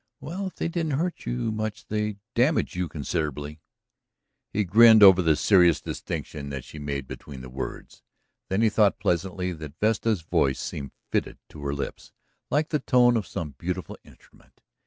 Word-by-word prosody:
"Well, 190 +5 -5
if 185 - -9
they - - -2
didn't 165 -3 -2
hurt 175 +3 -3
you 120 -2 -1
much 110 0 -4
they 105 -1 -2 0.2
damaged 135 +6 +2
you 90 -1 -1
considerably." 75 0 -4 0.9
He 105 - +1
grinned 110 +3 +7
over 95 -2 +9
the 80 -3 +3
serious 90 -3 +4
distinction 70 -2 -5
that 70 -2 -5
she 75 - -10
made 70 -2 -4
between 70 -3 -9
the 65 -1 -10
words. 65 +1 -7 0.5
Then 95 +4 +1
he 110 - +5
thought, 105 -2 +3
pleasantly, 90 +1 -1
that 80 -2 -9
Vesta's 110 -2 +1
voice 70 -4 +1
seemed 70 -1 -5 0.2
fitted - - -1
to 75 - -11
her 70 - -1
lips 70 - -6 0.4
like 150 +2 +1
the 150 - 0
tone 125 -2 +4
of 110 -5 -1
some 75 -4 -5
beautiful 90 +1 -4
instrument. - - -22
95 Hz, 170 wpm, -26 LUFS, 75-115 Hz, 0.9 s, over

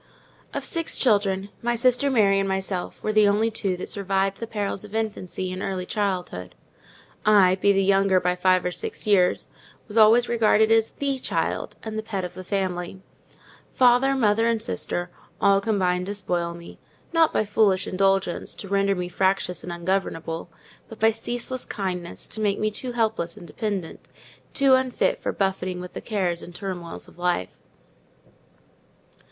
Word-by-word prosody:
Of - - -3
six 330 -2 0
children, 200 -4 +2
my 240 0 0
sister 255 +3 +3
Mary 200 -6 +4
and 195 0 0
myself 190 -1 -3
were 215 - 0
the 215 -1 +5
only 215 +3 +2
two 195 -4 -2
that - - -5
survived 195 -1 -1
the 230 - -5
perils 205 -2 -3
of 210 0 -9
infancy 190 -4 -3
and 185 - -5
early 190 -2 -3
childhood. 185 - -3 0.7
I, 200 -4 +6
being 200 -1 +4
the 195 - +3
younger 195 -1 +4
by 180 0 0
five 185 0 +2
or 180 - 0
six - - -5
years, 195 -4 +3 0.4
was 215 0 -6
always 225 +2 +6
regarded 220 -1 +3
as 225 0 +4
the 275 -2 -2
child, - - -2
and 220 -1 -4
the - - -2
pet 200 -4 -4
of 180 - -7
the 185 +1 -8
family: 185 -1 -3 0.7
father, 255 +2 +4
mother, 225 -2 +3
and 230 -1 +1
sister, 175 -5 -3 0.3
all 195 0 +4
combined 185 -4 0
to 205 - -3
spoil 175 -3 -2
me—not 320 - -2
by 215 - +1
foolish 205 -2 +2
indulgence, 195 -1 0
to 200 - -8
render 200 0 +2
me 180 -1 -3
fractious 190 0 0
and 180 - -6
ungovernable, 170 -2 -2 0.4
but 225 - -11
by 220 +1 +5
ceaseless 245 +3 -4
kindness, 180 -4 -4
to 220 - -4
make 205 -2 +1
me 215 0 0
too 245 +4 -6
helpless 220 -7 -1
and - - -10
dependent—too 215 - -2
unfit 260 -1 +1
for - - -1
buffeting 185 -2 -1
with 180 0 -8
the - - -6
cares 185 -6 -1
and 175 - -11
turmoils 180 -4 -5
of - - -17
life. 175 - -1
195 Hz, 165 wpm, -24 LUFS, 185-220 Hz, 0.7 s, I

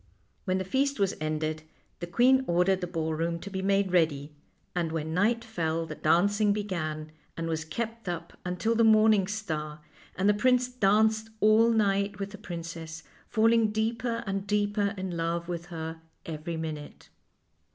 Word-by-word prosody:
When 185 -1 +1
the 190 - -1
feast 270 +6 0
was 195 -2 +2
ended 155 0 -2 0.4
the 175 - -5
queen 255 +8 +4
ordered 180 +2 +2
the 180 - -2
ballroom 165 0 -1
to 200 +4 -9
be 190 0 -3
made 195 0 +2
ready, 155 -4 +1 0.4
and 170 -2 -1
when 160 0 -3
night 225 +6 +2
fell 165 -7 -2
the 155 - -6
dancing 200 +7 +3
began, 155 -7 -3 0.3
and 165 0 -3
was 160 -1 -2
kept 225 +5 -5
up 170 -1 -5
until 180 +5 0
the 230 0 +3
morning 215 -3 +5
star, 155 -8 -4 0.4
and 190 +3 +1
the 205 - +6
prince 250 +4 +3
danced 220 -1 +2
all 215 +2 +5
night 200 -2 +1
with 200 0 -5
the 205 - -10
princess, 165 -2 -7 0.3
falling 225 0 +4
deeper 230 +2 -1
and 195 0 -3
deeper 205 0 +1
in 185 -2 -4
love 170 +1 -2
with 175 -1 -5
her 160 -1 -6 0.2
every 160 +1 -5
minute. 155 -2 -7
190 Hz, 160 wpm, -28 LUFS, 165-215 Hz, 0.4 s, the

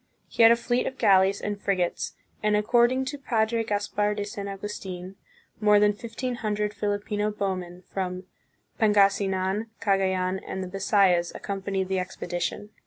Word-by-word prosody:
He - - -2
had 225 0 +9
a - - +7
fleet 240 +1 0
of 265 - -5
galleys 195 0 +4
and 205 -1 -4
frigates, 185 -3 -1 0.3
and, 210 0 +2
according 240 +5 +3
to 290 +2 -5
Padre 230 -3 0
Caspar 205 -1 -1
de 205 -1 -3
San 200 -1 -6
Augustin, 195 -2 -6 0.4
more 210 -1 +5
than 210 0 +4
fifteen 235 +3 -5
hundred 210 -2 -1
Filipino 205 0 -1
bowmen 185 -3 -4
from 185 -1 -3 0.6
Pangasi 200 -2 +4
nan, 190 +4 -1
Cagayan, 190 -2 +1
and 190 - -4
the - - -5
Bisayas 185 -2 +2
accompanied 195 -1 -3
the 190 0 0
expedition. 180 +3 -4
205 Hz, 150 wpm, -26 LUFS, 190-210 Hz, 0.6 s, had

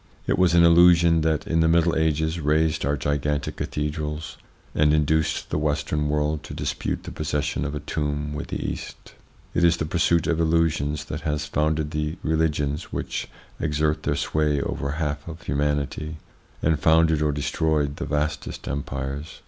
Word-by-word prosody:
It - - +1
was 90 -2 +4
an 85 - +7
illusion 85 -1 +6
that, 80 -1 0
in 80 - +1
the 80 - +4
Middle 85 0 +3
Ages, 80 +1 +1
raised 75 -1 +1
our 70 0 +1
gigantic 75 +1 -1
cathedrals, 75 +1 -4 0.3
and 75 0 +3
induced 80 +1 +1
the - - 0
Western 75 0 0
world 75 +1 0
to - - -9
dispute - - -3
the - - -7
possession 75 -1 -2
of 75 0 -3
a - - -2
tomb 75 -1 -2
with 75 - -5
the - - -4
East. - - -7 0.4
It 85 - +1
is 85 -1 +5
the 80 - -2
pursuit 85 0 +2
of 80 0 0
illusions 80 -2 +1
that 80 +1 -5
has 75 -1 -1
founded 75 0 0
the 75 +2 -2
religions 80 -1 0
which - - -3 0.3
exert 75 -1 0
their - - 0
sway 75 -2 +1
over 70 0 -3
a 70 - -3
half 75 -1 -3
of 85 0 -8
humanity, 75 +2 -1 0.5
and 80 -1 +2
founded 80 0 +4
or 75 -1 +2
destroyed 75 0 0
the - - -3
vastest 75 +1 -2
empires. 70 +2 -4
75 Hz, 170 wpm, -24 LUFS, 75-80 Hz, 0.5 s, an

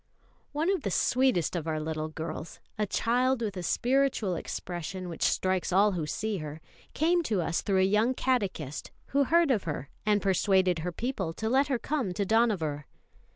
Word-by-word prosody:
One 315 +5 +1
of 385 - 0
the 200 - -2
sweetest 245 - +2
of 165 -2 -3
our 155 -1 -1
little 155 0 -3
girls, 160 +1 -6 0.2
a 210 -1 -1
child 245 +4 +1
with 205 -3 -3
a 180 - -4
spiritual 250 +1 +1
expression 180 +2 -5
which 165 - -8
strikes 185 -1 +1
all 200 +3 +5
who 165 -5 -3
see 215 +5 -2
her, 155 -2 -6 0.4
came 345 +3 +3
to 220 - -1
us 165 0 0
through 190 -2 +2
a - - +4
young 215 +6 +2
catechist 195 - -1 0.2
who 280 0 +3
heard 335 0 +4
of 215 -7 +1
her 145 -3 -4
and 210 -1 +3
persuaded 190 -2 +2
her 180 +3 -3
people 195 -4 -3
to 220 +6 -3
let 265 +5 +3
her 270 -3 +1
come 250 -6 -2
to 205 - 0
Dohnavur. 185 -10 +1
200 Hz, 185 wpm, -29 LUFS, 170-250 Hz, 0.4 s, all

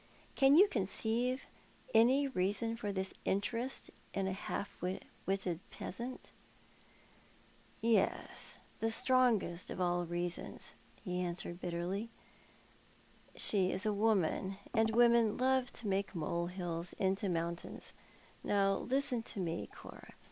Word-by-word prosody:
Can 270 0 +6
you 390 +6 +8
conceive 235 - 0 0.5
any 255 +5 +5
reason 225 0 0
for 210 -3 -3
this 190 -1 -2
interest 230 +6 -1 0.2
in 195 - 0
a - - 0
half 195 +1 -5
wutted 185 -1 -3
peasant? 240 +6 -6 0.8
" - - -28
"Yes; 230 -1 0 0.2
the 225 - +1
strongest 230 -7 +2
of - - -5
all 175 -1 +1
reasons," 175 +1 -3 0.3
he 180 0 -2
answered 175 0 -2
bitterly; 180 +6 -2 0.6
" - - -28
she 190 -3 +3
is 190 - -1
a 215 - +2
woman, 200 -2 +1 0.2
and 220 -1 +3
women 235 -2 +5
love 260 0 +2
to 225 - -3
make 195 0 0
molehills 170 +1 -2
into 195 +1 0
mountains. 170 0 -3 0.5
Now, 195 -1 +3
listen 265 -1 0
to 220 - -6
me, 170 -2 -2
Cora. - - -12
200 Hz, 120 wpm, -35 LUFS, 180-235 Hz, 0.8 s, you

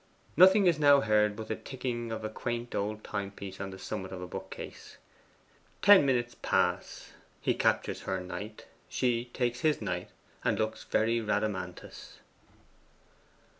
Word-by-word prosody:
Nothing 190 +4 +7
is 170 -4 +3
now 145 -1 +6
heard 105 -2 +3
but 110 +1 -7
the 110 - -2
ticking 120 -3 -4
of 110 -1 -4
a 110 - -2
quaint 120 +2 -4
old 105 +1 -2
timepiece 100 -1 -5
on 100 - -4
the 95 - -9
summit 95 0 -5
of 95 - -6
a 90 - -5
bookcase. 90 - -8 0.9
Ten 200 -7 +8
minutes 120 -2 0
pass; - - 0 0.3
he - - +1
captures - - 0
her 95 - -2
knight; 100 +4 -7 0.2
she 120 -1 0
takes 120 0 -2
his 155 -1 +2
knight, 90 -4 -3 0.3
and - - +1
looks 110 0 -2
a - - -26
very 115 +2 +2
Rhadamanthus. 105 -4 -3
110 Hz, 150 wpm, -30 LUFS, 100-125 Hz, 0.9 s, Ten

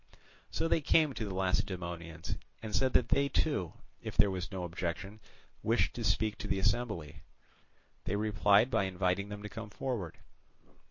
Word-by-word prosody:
So - - 0
they 165 - +3
came 150 -1 +4
to 110 - -3
the 100 - -4
Lacedaemonians 85 -3 -2 0.3
and 110 -1 -3
said 130 -1 +2
that 120 - +4
they 140 0 +3
too, 140 - 0 0.3
if - - -6
there 100 - +6
was 90 0 -4
no 95 -2 -3
objection, 90 +4 -4 0.4
wished - - +2
to - - -4
speak 110 -1 +1
to - - -4
their 95 - 0
assembly. 100 - 0 0.8
They 100 - 0
replied 105 +2 +4
by 100 - +3
inviting 95 +1 0
them 105 0 -7
to - - -4
come 110 +1 -7
forward. 105 -6 -3
100 Hz, 165 wpm, -33 LUFS, 90-110 Hz, 0.8 s, there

